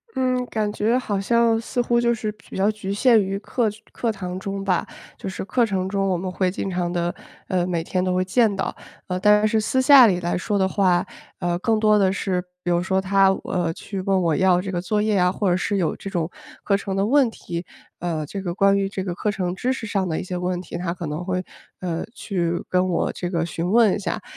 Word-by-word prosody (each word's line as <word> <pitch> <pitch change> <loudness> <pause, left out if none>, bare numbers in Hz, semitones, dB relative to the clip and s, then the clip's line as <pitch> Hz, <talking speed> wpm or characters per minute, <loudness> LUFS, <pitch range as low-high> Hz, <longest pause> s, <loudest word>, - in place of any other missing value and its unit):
嗯。 255 -1 +1
感 210 -2 -1
觉 230 +4 +1
好 205 -6 -2
像 230 +2 +3
似 245 +1 -1
乎 235 0 +2
就 235 0 +3
是 215 -2 -3
比 210 - -14
较 200 +3 +3
局 200 -2 -5
限 225 0 +5
于 195 +1 -2
课 225 +1 0 0.2
课 230 -2 -1
堂 185 -2 -5
中 195 0 -4
吧， 185 -3 0 0.3
就 - - -7
是 190 - -5
课 240 +2 +2
程 190 -3 -1
中 195 0 0
我 180 - +1
们 185 +1 -4
会 185 0 0
经 195 +1 -3
常 175 -1 -1
地 175 0 -1 0.4
呃， 180 -2 +1
每 170 -2 -1
天 185 +1 -1
都 185 -1 0
会 185 - +2
见 220 +1 +3
到。 195 - -3 0.3
呃， 180 0 -2
但 210 +2 +5
是 220 +1 +2
私 260 +4 +1
下 260 -3 +8
里 180 -3 +1
来 175 +1 -1
说 205 +3 -1
的 190 -1 +2
话， 185 -3 +2 0.3
呃， 175 -1 -1
更 220 +2 +1
多 215 -1 +4
的 190 -1 +3
是， 190 -2 -1 0.2
比 175 - 0
如 175 0 +2
说 190 +1 +1
他， 195 0 +4
呃， 175 -3 -1
去 195 +2 -6
问 190 -1 +1
我 160 -3 +2
要 185 -1 +3
这 190 0 -5
个 175 -1 -2
作 210 +3 0
业 210 -2 +1
啊， 180 0 +3
或 195 0 0
者 180 - +2
是 200 - -1
有 175 - 0
这 195 - -7
种 170 -3 -2 0.3
课 200 -1 +2
程 195 -1 -4
的 195 +1 +1
问 265 0 +4
题， 170 -5 -6 0.3
呃， 165 -3 -2
这 195 +6 -6
个 175 -2 -3
关 200 0 +4
于 195 - 0
这 190 -1 -4
个 180 -2 -3
课 210 - -2
程 180 -3 -2
知 250 +7 -1
识 230 - -6
上 195 -3 -1
的 160 - -1
一 - - -4
些 180 -1 -4
问 180 0 -2
题。 170 - -7
他 175 -1 -2
可 175 -2 -6
能 150 +4 -4
会， 185 0 -2 0.4
呃， 170 -1 -2
去 175 -4 -2
跟 185 0 +2
我 170 - 0
这 175 - -4
个 170 -2 0
询 170 +1 -3
问 225 -3 +5
一 - - -2
下， 205 - -3
190 Hz, 265 characters per minute, -23 LUFS, 180-210 Hz, 0.4 s, 下